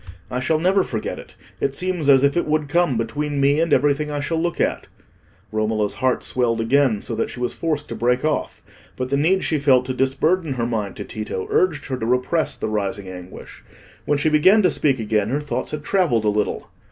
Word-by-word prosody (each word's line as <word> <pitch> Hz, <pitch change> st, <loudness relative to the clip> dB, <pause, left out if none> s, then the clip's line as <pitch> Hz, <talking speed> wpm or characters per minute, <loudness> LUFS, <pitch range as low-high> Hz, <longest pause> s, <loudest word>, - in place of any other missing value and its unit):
I 125 Hz, -, -1 dB
shall 145 Hz, +5 st, +1 dB
never 185 Hz, +4 st, +3 dB
forget 110 Hz, -11 st, -4 dB
it; -, -, -13 dB, 0.2 s
it 140 Hz, 0 st, -1 dB
seems 180 Hz, -3 st, 0 dB
as 135 Hz, -1 st, +6 dB
if 140 Hz, 0 st, +3 dB
it 175 Hz, -, 0 dB
would 155 Hz, -1 st, 0 dB
come 170 Hz, -5 st, +1 dB
between 145 Hz, +6 st, -2 dB
me 140 Hz, +2 st, +3 dB
and 165 Hz, -1 st, +1 dB
everything 145 Hz, +2 st, +2 dB
I 145 Hz, -1 st, -3 dB
shall 160 Hz, +3 st, -1 dB
look 170 Hz, 0 st, -2 dB
at." -, -, -1 dB, 0.6 s
Romola's 110 Hz, -1 st, 0 dB
heart 130 Hz, -1 st, 0 dB
swelled 120 Hz, -2 st, 0 dB
again, 120 Hz, -1 st, +2 dB
so -, -, -2 dB
that 115 Hz, -, -1 dB
she -, -, -8 dB
was 125 Hz, 0 st, -2 dB
forced 155 Hz, -3 st, -2 dB
to -, -, -4 dB
break 125 Hz, +3 st, +1 dB
off. 155 Hz, -, -2 dB, 0.3 s
But 130 Hz, 0 st, -4 dB
the 140 Hz, -, +1 dB
need 180 Hz, +6 st, +2 dB
she 155 Hz, -, 0 dB
felt 130 Hz, -3 st, +4 dB
to 130 Hz, -, -3 dB
disburden 140 Hz, +5 st, +1 dB
her 120 Hz, -2 st, -2 dB
mind 110 Hz, -5 st, -3 dB
to -, -, -6 dB
Tito 105 Hz, -4 st, -5 dB
urged 165 Hz, -6 st, +1 dB
her 130 Hz, -, -3 dB
to 110 Hz, -, -3 dB
repress 125 Hz, +7 st, +1 dB
the -, -, -4 dB
rising 100 Hz, -2 st, -3 dB
anguish. 90 Hz, 0 st, -10 dB, 0.4 s
When 145 Hz, -, +1 dB
she 150 Hz, +2 st, +1 dB
began 185 Hz, +8 st, +5 dB
to 180 Hz, -, +4 dB
speak 135 Hz, -4 st, +1 dB
again, 105 Hz, -1 st, 0 dB
her 140 Hz, +4 st, 0 dB
thoughts 145 Hz, -1 st, -4 dB
had 150 Hz, -1 st, -5 dB
travelled 155 Hz, -, +1 dB
a -, -, +4 dB
little. 105 Hz, 0 st, -2 dB
140 Hz, 220 wpm, -21 LUFS, 115-155 Hz, 0.6 s, as